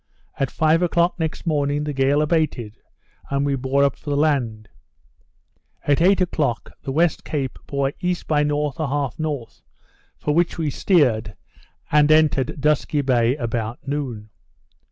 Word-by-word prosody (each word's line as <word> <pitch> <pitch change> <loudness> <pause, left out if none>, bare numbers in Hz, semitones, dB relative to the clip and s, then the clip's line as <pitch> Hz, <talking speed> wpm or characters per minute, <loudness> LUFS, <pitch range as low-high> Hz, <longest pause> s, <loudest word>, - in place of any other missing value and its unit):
At 135 - +1
five 160 +2 +2
o'clock 175 0 +1
next 160 +1 -3
morning, 145 -2 0
the 150 0 -3
gale 140 +2 +2
abated, 150 -9 -1 0.5
and 140 0 0
we 140 -1 +1
bore 135 +2 +1
up 140 - +2
for 150 - -9
the 145 - 0
land; 125 -8 0 1.2
at 145 +1 +2
eight 190 +3 +5
o'clock, 150 -9 -1
the 135 - -4
West 165 +3 +1
Cape 135 -4 -3
bore 140 0 -1
E. 180 -1 0
by 150 -2 +2
N. 150 - +1
1/2 145 -2 -1 0.5
N., - - -42 0.5
for 150 - -1
which 170 +2 +1
we 155 -3 -1
steered, 125 - +2 0.6
and 150 0 +5
entered 155 -3 +3
Dusky 150 0 +1
Bay 125 -2 +2
about 120 -1 -4
noon. 125 -7 -4
145 Hz, 150 wpm, -22 LUFS, 135-155 Hz, 1.2 s, eight